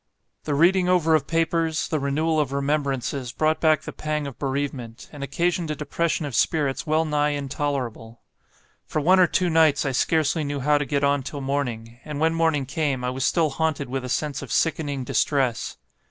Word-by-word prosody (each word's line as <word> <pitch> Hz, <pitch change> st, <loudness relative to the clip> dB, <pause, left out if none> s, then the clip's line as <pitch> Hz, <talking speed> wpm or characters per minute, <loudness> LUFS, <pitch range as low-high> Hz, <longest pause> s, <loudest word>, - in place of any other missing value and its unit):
The 145 Hz, -, 0 dB
reading 180 Hz, +4 st, +4 dB
over 170 Hz, -3 st, +3 dB
of 155 Hz, -3 st, +2 dB
papers, 165 Hz, -2 st, 0 dB
the 155 Hz, -, -1 dB
renewal 155 Hz, +3 st, 0 dB
of 145 Hz, -3 st, 0 dB
remembrances 140 Hz, -3 st, -1 dB
brought 155 Hz, +3 st, +1 dB
back 155 Hz, -1 st, +3 dB
the -, -, -7 dB
pang 150 Hz, -1 st, -3 dB
of 140 Hz, -3 st, -8 dB
bereavement, 135 Hz, -4 st, -4 dB
and 145 Hz, -2 st, -7 dB
occasioned 170 Hz, +4 st, -1 dB
a 150 Hz, -, -1 dB
depression 155 Hz, +2 st, -1 dB
of 140 Hz, -, -5 dB
spirits 140 Hz, +4 st, 0 dB
well 155 Hz, +1 st, +2 dB
nigh 150 Hz, -1 st, +1 dB
intolerable. 135 Hz, -5 st, -4 dB, 0.7 s
For -, -, -1 dB
one 185 Hz, +5 st, +4 dB
or 180 Hz, -, +6 dB
two 180 Hz, -, +1 dB
nights, 155 Hz, -3 st, +4 dB
I 135 Hz, -, 0 dB
scarcely 155 Hz, +4 st, +1 dB
knew 145 Hz, -1 st, -3 dB
how 145 Hz, +2 st, +3 dB
to 145 Hz, -, -1 dB
get 140 Hz, -1 st, -1 dB
on 140 Hz, 0 st, +2 dB
till 140 Hz, +2 st, -6 dB
morning; 120 Hz, -4 st, -3 dB
and 150 Hz, -1 st, -5 dB
when 160 Hz, +1 st, +2 dB
morning 160 Hz, -4 st, +1 dB
came, 140 Hz, -2 st, -1 dB
I 125 Hz, -, -1 dB
was 130 Hz, +1 st, -2 dB
still 160 Hz, -2 st, +2 dB
haunted 150 Hz, -2 st, -1 dB
with 135 Hz, 0 st, -3 dB
a 125 Hz, -, -5 dB
sense 145 Hz, +1 st, -2 dB
of 140 Hz, -, -8 dB
sickening 145 Hz, -4 st, 0 dB
distress. 130 Hz, -2 st, 0 dB
145 Hz, 195 wpm, -24 LUFS, 135-160 Hz, 0.7 s, or